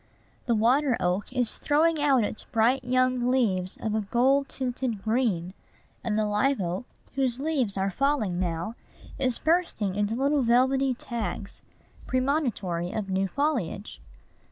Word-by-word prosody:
The 235 - +3
water 250 +4 +3
oak 180 +5 -1
is 250 -3 -1
throwing 310 +1 +2
out 275 -5 +4
its 210 - -4
bright 245 +4 +2
young 255 0 +1
leaves 195 -8 +1
of 220 - -3
a 220 - +1
gold 260 +6 +2
tinted 250 -5 -3
green; 220 -7 0 0.5
and 220 -2 -1
the 215 - +2
live 210 +6 +1
oak, 180 +4 -3 0.3
whose 260 -2 0
leaves 270 -9 -1
are 195 +1 0
falling 220 -6 0
now, 170 +3 -2 0.5
is 255 -3 +1
bursting 315 - 0
into 205 +2 0
little 280 +3 +2
velvety 260 +2 +3
tags, 230 -5 -5 0.5
premonitory 250 - 0
of 200 -3 -3
new 190 +1 +1
foliage. 240 - -2
240 Hz, 140 wpm, -27 LUFS, 200-270 Hz, 0.5 s, out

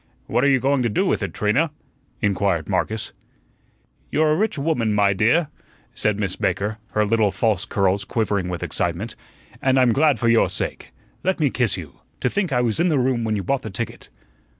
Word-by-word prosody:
"What - - 0
are - - +4
you 135 -1 +4
going 135 +1 +1
to 120 - +1
do 105 - +1
with - - +1
it, - - -3
Trina?" 120 +11 +1 0.5
inquired 100 -5 +1
Marcus. 110 -1 -2 1.0
"You're 155 0 +2
a - - +3
rich 215 +2 0
woman, 140 -8 0
my 100 -1 +3
dear," 120 - +2 0.4
said 105 -2 0
Miss 100 -3 -2
Baker, 105 +4 -1
her 105 0 +2
little 110 0 +2
false 100 +1 0
curls 100 0 +1
quivering 100 -3 -1
with 90 -1 -4
excitement, - - -2 0.5
"and 130 0 +2
I'm 125 -3 +4
glad 150 +1 +3
for 120 - 0
your 115 0 +4
sake. - - -3 0.3
Let 190 0 0
me 145 -4 +2
kiss 120 -6 +1
you. 75 -7 -10 0.2
To 125 - +1
think 195 -5 -1
I 125 -2 +2
was 120 +1 0
in 175 +1 +3
the 155 - +2
room 125 -2 +1
when 110 -1 0
you 100 - -2
bought 135 +8 0
the 110 - -6
ticket!" 95 - -5
115 Hz, 200 wpm, -22 LUFS, 100-135 Hz, 1.0 s, are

